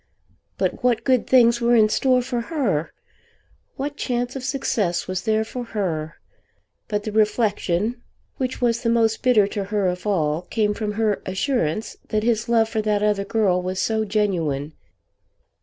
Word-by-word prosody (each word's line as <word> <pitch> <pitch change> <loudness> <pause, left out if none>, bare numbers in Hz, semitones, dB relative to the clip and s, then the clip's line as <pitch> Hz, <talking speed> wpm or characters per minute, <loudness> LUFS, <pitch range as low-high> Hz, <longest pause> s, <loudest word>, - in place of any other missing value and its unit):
But - - -2
what 240 -2 +2
good 255 -3 +2
things 235 -2 +5
were 240 +1 +4
in 220 -2 +6
store 255 +3 +2
for 245 -1 -2
her? 215 - -1 0.8
What 285 +2 -4
chance 245 0 -2
of 265 - -5
success 215 -10 -1
was 185 0 -2
there 220 -1 +2
for 245 +3 -6
her? 170 -9 -3 0.7
But 210 -1 -2
the 215 - -4
reflection 215 0 0 0.4
which 260 -1 -3
was 235 -1 +1
the 230 - 0
most 225 -1 +2
bitter 245 -6 +4
to 200 -1 -3
her 205 0 -1
of 180 +2 -2
all 160 -5 +1
came 210 +3 0
from 210 0 -3
her 215 -1 0
assurance 190 - -1
that 215 0 0
his 230 0 0
love 225 -1 +4
for 220 -1 -1
that 210 -1 0
other 205 -1 +1
girl 195 -5 +1
was 185 +1 -3
so 220 +1 +1
genuine. 170 -9 -1
215 Hz, 165 wpm, -22 LUFS, 195-240 Hz, 0.8 s, in